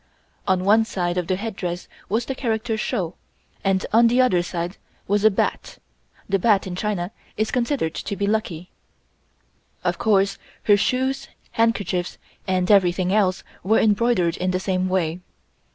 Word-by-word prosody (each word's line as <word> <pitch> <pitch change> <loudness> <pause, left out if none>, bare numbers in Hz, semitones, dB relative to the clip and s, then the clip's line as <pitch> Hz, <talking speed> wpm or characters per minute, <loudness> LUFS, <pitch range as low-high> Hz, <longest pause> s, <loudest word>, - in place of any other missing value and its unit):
On 185 -1 +2
one 215 +3 +5
side 175 -5 -2
of 175 - -4
the 185 - +1
headdress 185 -4 -4 0.2
was 225 +4 0
the 270 - -2
character 225 -3 -1
(shou) 200 -6 -2 0.5
and 190 -1 +1
on 230 +1 +6
the 245 +2 +2
other 220 -9 +4
side 175 +1 -4 0.3
was 205 +1 +1
a 220 - +8
bat 195 - -2 0.5
(the 195 0 +1
bat 205 0 +3
in 185 -2 -5
China 185 -2 -2 0.3
is 215 +1 0
considered 245 - 0
to 200 - -4
be 200 - -1
lucky). 190 -5 -2 1.1
Of - - -1
course 195 -2 +2 0.2
her 205 - +6
shoes, 260 +6 0 0.2
handkerchiefs 205 -6 0 0.3
and 185 0 +1
everything 185 -1 +3
else 190 -3 +2 0.2
were 215 +5 +3
embroidered 205 -5 +2
in 185 - -1
the 185 0 0
same 185 0 -1
way. 175 -2 0
195 Hz, 155 wpm, -23 LUFS, 180-220 Hz, 1.1 s, a